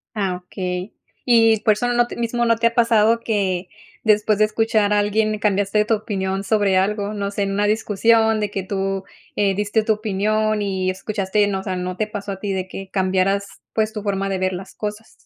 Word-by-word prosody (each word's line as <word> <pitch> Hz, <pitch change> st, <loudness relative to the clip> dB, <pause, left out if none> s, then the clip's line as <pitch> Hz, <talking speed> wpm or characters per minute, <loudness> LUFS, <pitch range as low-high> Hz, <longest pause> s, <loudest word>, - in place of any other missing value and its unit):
Ah, 195 Hz, -4 st, -1 dB
okey. 180 Hz, +1 st, -4 dB, 0.3 s
Y 225 Hz, -3 st, +4 dB
por 215 Hz, -, +4 dB
eso 245 Hz, +4 st, -2 dB
no 240 Hz, 0 st, +2 dB
t -, -, -8 dB
te -, -, -6 dB
mismo 235 Hz, +1 st, 0 dB
no 230 Hz, -1 st, +3 dB
te 230 Hz, +1 st, +1 dB
ha 230 Hz, -, +1 dB
pasado 230 Hz, -1 st, +3 dB
que 195 Hz, -5 st, -1 dB, 0.4 s
después 210 Hz, -1 st, +3 dB
de 215 Hz, -, +5 dB
escuchar 215 Hz, -1 st, +1 dB
a 210 Hz, -, +3 dB
alguien 215 Hz, +1 st, +1 dB
cambiaste 205 Hz, 0 st, +1 dB
tu 225 Hz, -, +3 dB
opinión 195 Hz, -3 st, -3 dB
sobre 205 Hz, -2 st, +2 dB
algo, 205 Hz, +2 st, 0 dB
no 200 Hz, -1 st, -2 dB
sé, 200 Hz, 0 st, -2 dB
en 195 Hz, 0 st, -1 dB
una 205 Hz, +1 st, +1 dB
discusión 220 Hz, +1 st, +2 dB
de 210 Hz, -1 st, -1 dB
que 195 Hz, -, -3 dB
tú, 195 Hz, 0 st, -2 dB, 0.3 s
eh, 200 Hz, -1 st, +2 dB
diste 210 Hz, +2 st, 0 dB
tu 220 Hz, -, +3 dB
opinión 215 Hz, +1 st, 0 dB
y 190 Hz, -2 st, -1 dB
escuchaste, 200 Hz, +1 st, 0 dB
uno, 195 Hz, -1 st, -2 dB
o -, -, -8 dB
sea, 190 Hz, -2 st, -3 dB
¿no 180 Hz, 0 st, -4 dB
te 215 Hz, +2 st, -1 dB
pasó 205 Hz, -2 st, -5 dB
a 195 Hz, -, -8 dB
ti, 200 Hz, -1 st, -2 dB
de 190 Hz, -1 st, -3 dB
que 195 Hz, +1 st, -8 dB
cambiaras, 190 Hz, +1 st, +1 dB, 0.3 s
pues, 220 Hz, -1 st, 0 dB
tu 210 Hz, -2 st, -5 dB
forma 195 Hz, -1 st, -1 dB
de 195 Hz, -1 st, -1 dB
ver 185 Hz, 0 st, 0 dB
las 190 Hz, +1 st, -7 dB
cosas? 210 Hz, +1 st, -6 dB
205 Hz, 220 wpm, -21 LUFS, 195-220 Hz, 0.4 s, de